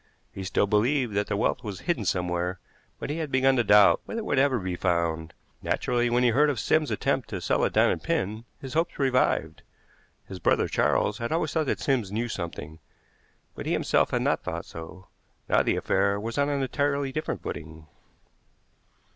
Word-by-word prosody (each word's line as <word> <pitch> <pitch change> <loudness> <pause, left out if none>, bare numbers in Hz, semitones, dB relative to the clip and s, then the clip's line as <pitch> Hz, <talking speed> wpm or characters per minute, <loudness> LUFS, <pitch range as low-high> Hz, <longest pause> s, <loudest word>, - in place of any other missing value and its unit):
He 95 - -6
still 95 +1 +1
believed 115 +4 +1
that 105 +1 0
the 105 -1 -1
wealth - - 0
was 100 -4 -6
hidden 155 - -1
somewhere, 90 0 -1 0.4
but - - -5
he 155 - -3
had 155 -3 -4
begun 130 0 +3
to 120 - +3
doubt 105 -1 +6
whether 230 - -4
it - - -7
would 135 - +1
ever 135 -2 +3
be 90 -4 -3
found. 85 -3 -1 0.3
Naturally, 120 0 0
when 120 +1 +2
he 125 - +5
heard 145 +6 +4
of 135 -6 -1
Sims's 155 +7 +2
attempt 135 -2 -1
to 95 - -4
sell 85 - 0
a - - +3
diamond - - +2
pin, 110 +4 -2
his 135 -2 -8
hopes 165 +2 0
revived. 130 -2 +1 0.7
His 95 -2 -8
brother - - +2
Charles 105 - +1
had 115 0 -3
always 160 -2 0
thought 155 -3 0
that - - -1
Sims 120 -8 0
knew 115 +3 -2
something, 80 -5 -6 0.7
but - - -7
he - - +1
himself - - +2
had - - 0
not - - +1
thought - - -5
so. 80 +3 -10 0.4
Now - - +4
the - - +1
affair 100 +1 +1
was 115 +2 -5
on 140 0 +2
an 140 -1 0
entirely 140 0 0
different 155 +3 -4
footing. 80 0 -7
115 Hz, 195 wpm, -26 LUFS, 95-135 Hz, 0.7 s, doubt